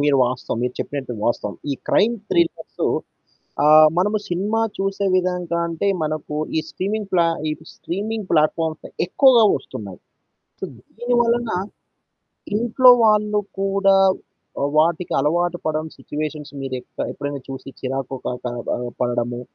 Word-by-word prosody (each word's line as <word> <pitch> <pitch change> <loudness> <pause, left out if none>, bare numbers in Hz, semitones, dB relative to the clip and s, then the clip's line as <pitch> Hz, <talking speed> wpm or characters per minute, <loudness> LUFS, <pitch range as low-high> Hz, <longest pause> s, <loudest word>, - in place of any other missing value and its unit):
మీరు 145 -1 +3
వాస్తవం 125 -2 -3
మీరు 125 0 -1
చెప్పినట్టు 135 -4 -4
వాస్తవం. 105 -3 -1 0.2
ఈ - - -1
క్రైమ్ 225 +4 +4 0.2
థ్రిల్లర్స్ 170 -2 0 0.8
ఆ! - - +4 0.3
మనము 210 +4 +2
సినిమా 205 +6 0 0.2
చూసే 195 +1 -1
విధంగా 180 -2 0
అంటే 170 +4 -2 0.2
మనకు 155 -1 -3 0.2
ఈ - - +4
స్ట్రీమింగ్ 205 +1 -3
ప్లా 170 -2 +4 0.2
ఈ - - 0 0.2
స్ట్రీమింగ్ 210 +3 -4
ప్లాట్‌ఫామ్స్ 155 0 +1 0.2
ఎక్కువగా 240 +4 +5
ఒస్తున్నాయి. 100 -8 -9 0.6
సొ - - -3 0.3
దీనివలన 240 -1 +2 1.1
ఇంట్లో 240 +3 +5
వాళ్ళు 210 -1 +3 0.2
కూడా 195 0 +3 0.7
ఆహ్, 140 - +1
వాటికలవాటు 170 +1 +1
పడం 155 0 -1
సిచ్యుయేషన్స్ 150 -1 -5
మీరు 135 -1 -4
ఎక్క - - -6
ఎప్పుడైనా 145 -1 -5
చూసి 135 0 -7
చిరాకు 135 0 -3
కా - - 0
క - - -2 0.3
ఆహ్, 120 0 -4
పడడము. 120 0 -1
170 Hz, 125 wpm, -21 LUFS, 140-200 Hz, 1.1 s, ఎక్కువగా